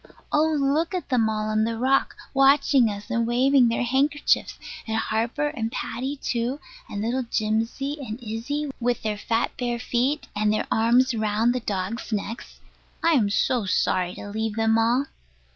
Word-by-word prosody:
Oh, 315 +1 +3
look 300 +6 +1
at 360 - -4
them 235 -4 +2
all 215 0 -2
on 215 0 +2
the 225 0 -1
rock 265 +3 +1 0.2
watching 275 -2 +4
us 205 +3 -7
and 235 -1 +1
waving 255 +1 +4
their 230 +2 0
handkerchiefs; 280 +4 +1 0.3
and 220 0 -1
Harper 230 +7 -1
and 230 -7 -3
Paddy 265 +5 -3
too, 250 0 -2 0.3
and 205 - -4
little 245 +4 0
Jimsy 230 +5 -2
and 230 -3 -6
Isy, 245 +6 -3
with 245 -1 -1
their 210 -1 -2
fat 230 +2 0
bare 240 -1 -1
feet, 250 +5 -1
and 210 0 +2
their 215 - 0
arms 240 +3 +3
round 220 +2 +1
the 255 - -1
dogs' 205 +1 -4
necks. 215 +2 -5 0.4
I 335 - +4
am 235 -10 +3
so 220 +1 +1
sorry 180 -1 +1
to 205 - -8
leave 220 0 -2
them 225 0 +2
all. 240 +5 +2
235 Hz, 170 wpm, -24 LUFS, 220-270 Hz, 0.4 s, watching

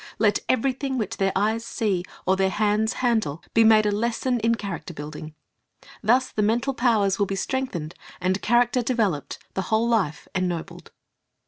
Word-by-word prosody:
Let 210 -2 +3
everything 265 +1 0
which 215 -5 -3
their 195 -1 +1
eyes 220 +3 +1
see 200 -6 -1 0.2
or 190 - +3
their 190 0 +2
hands 215 +3 +1
handle 215 -10 0
be 225 - +5
made 220 -1 +6
a 210 - +2
lesson 235 +4 0
in 230 +1 +2
character 190 -5 -6
building. 150 +1 -8 0.7
Thus 250 +4 +2
the 210 - -1
mental 235 +6 +1
powers 215 -6 +2
will 200 - +2
be 195 - -2
strengthened, 195 -8 -3 0.3
the 185 +2 0
character 240 +2 +2
developed, 220 - -1 0.2
the 190 - -1
whole 225 +2 +2
Jife 185 -10 0
ennobled. 180 -3 -3
215 Hz, 160 wpm, -24 LUFS, 190-235 Hz, 0.7 s, made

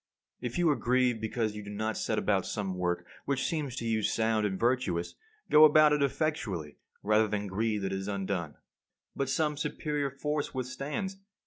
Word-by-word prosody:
If 120 -1 -4
you 175 -1 +3
are - - +2
grieved 125 -3 +1
because 110 -1 -1
you 105 - -5
do 100 - -9
not 110 +1 -2
set - - -1
about - - +1
some 100 -3 -2
work 90 -1 -1 0.2
which 140 -2 0
seems 150 -7 -2
to 115 - -4
you 110 -1 +1
sound 110 0 +1
and 95 -2 -4
virtuous, 115 -8 0 0.4
go 150 - +8
about 155 0 +7
it 150 - +1
effectually 130 - -1 0.3
rather 110 +1 +4
than 105 0 -2
grieve 105 +1 -1
that 95 0 -1
it 95 - -1
is 95 - -6
undone. 95 -6 -2 0.6
But 135 -1 -1
some 150 +1 +1
superior 150 -1 -2
force 145 +1 -3
withstands. 140 +10 -3
115 Hz, 185 wpm, -30 LUFS, 100-140 Hz, 0.6 s, go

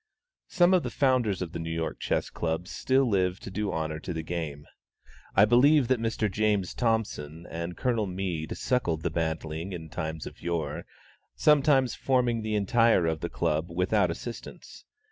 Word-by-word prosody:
Some 175 0 +4
of 185 - +4
the - - -4
founders 125 -9 +1
of 85 - -7
the 85 - -5
New 80 0 -4
York 80 -1 -3
Chess - - -1
Club 80 +2 -2
still 130 +5 +1
live 95 -3 +1
to - - -8
do 105 +1 -2
honor 80 -1 -3
to 90 - -5
the 80 -1 -4
game. 80 -4 -4 0.7
I 100 - +7
believe 130 +3 +5
that 130 -2 +3
Mr. 115 -1 0
James 105 -2 0
Thompson 100 -9 -2
and 85 +1 -5
Colonel 115 -5 0
Mead 90 -4 -3
suckled 85 -11 0
the - - -1
bantling 80 +2 -3
in 80 -2 -7
times 80 0 -4
of - - -10
yore, 80 -4 -3 0.5
sometimes 140 -4 +4
forming 125 -3 +1
the 110 0 -2
entire 110 -2 +3
of 80 -1 0
the - - -4
Club 80 +3 -1
without 90 +3 +1
assistance. 115 +8 -8
95 Hz, 170 wpm, -28 LUFS, 80-115 Hz, 0.7 s, I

